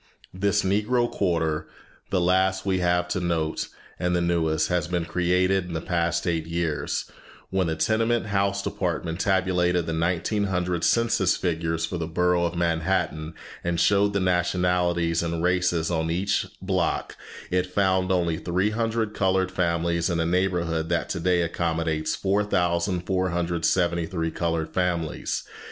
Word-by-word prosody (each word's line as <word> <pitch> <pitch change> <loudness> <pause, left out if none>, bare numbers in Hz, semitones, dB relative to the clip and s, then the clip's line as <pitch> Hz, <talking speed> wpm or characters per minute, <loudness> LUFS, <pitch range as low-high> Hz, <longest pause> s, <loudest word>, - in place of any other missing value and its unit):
This 100 +3 +1
Negro 105 +6 +2
quarter, 80 -5 0 0.4
the 95 - +1
last 95 +2 +2
we 95 -2 +1
have 90 0 +1
to 95 - -1
note 85 -3 -1 0.3
and 90 0 +1
the - - +2
newest, 80 -2 +1
has 90 -3 0
been 90 -1 -1
created 90 +2 +1
in 90 - -7
the 80 - -1
past 85 0 -1
eight 80 -2 -1
years. 85 -2 -2 0.5
When 95 -2 +1
the 80 - -1
Tenement 115 +5 +1
House 100 -1 0
Department 85 -2 -2
tabulated 90 -3 +1
the 80 - -3
1900 90 +1 0
census 115 -5 +3
figures 80 -2 -1
for 85 +1 -4
the 80 - -2
Borough 90 +1 +2
of 85 0 -2
Manhattan, 85 -2 -1 0.3
and 85 -1 -1
showed 100 +2 +3
the 100 - +1
nationalities 90 -2 +1
and 85 0 -2
races 90 -2 +1
on 80 -1 0
each 95 +5 0 0.2
block, 95 -2 -1 0.4
it 90 0 +1
found 95 -1 +1
only 85 -3 +1
300 110 +4 0
colored 95 -2 +1
families 85 -2 0
in 85 -1 0
a 80 - +1
neighborhood 85 -2 0
that 85 -1 0
today 90 0 +1
accommodates 80 -2 -1
4473 90 -3 0
colored 80 -1 -2
families. 85 -4 -1
90 Hz, 140 wpm, -25 LUFS, 85-95 Hz, 0.5 s, census